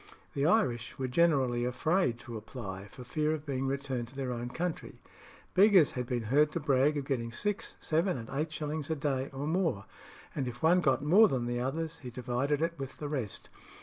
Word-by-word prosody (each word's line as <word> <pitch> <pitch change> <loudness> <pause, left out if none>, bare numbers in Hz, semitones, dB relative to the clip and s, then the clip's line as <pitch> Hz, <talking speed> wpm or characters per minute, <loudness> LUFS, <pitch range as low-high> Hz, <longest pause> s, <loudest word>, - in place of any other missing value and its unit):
The 140 +1 +1
Irish 125 - +1
were 130 - -2
generally 130 -4 +2
afraid 125 +2 +1
to 120 0 -8
apply, 105 -3 -7
for 125 - -11
fear 155 +5 0
of 155 -1 -9
being 135 -2 -2
returned 135 -3 -2
to 130 - -16
their 135 -2 -2
own 120 0 -4
country. 170 +5 -4 0.5
Beggars 195 -5 +6
had 125 -1 -4
been 120 -2 -1
heard 145 +7 +3
to - - -1
brag 145 0 +3
of 140 - -3
getting 120 -4 -2
six, 205 - -3
seven, 165 +1 +1
and 115 -2 -7
eight 150 +4 -2
shillings 155 0 -3
a 160 - +1
day, 140 -2 -1
or 135 +1 -4
more; 160 - 0 0.5
and 135 -3 -2
if 125 +4 -7
one 175 +3 +5
got 135 -3 +2
more 200 +9 +7
than 130 -8 -1
the 120 0 -1
others, 155 +6 -3
he 125 - -7
divided 130 +5 -1
it 165 -2 -2
with 135 -1 -6
the 150 - -5
rest. 130 -9 -4
140 Hz, 205 wpm, -31 LUFS, 125-155 Hz, 0.5 s, more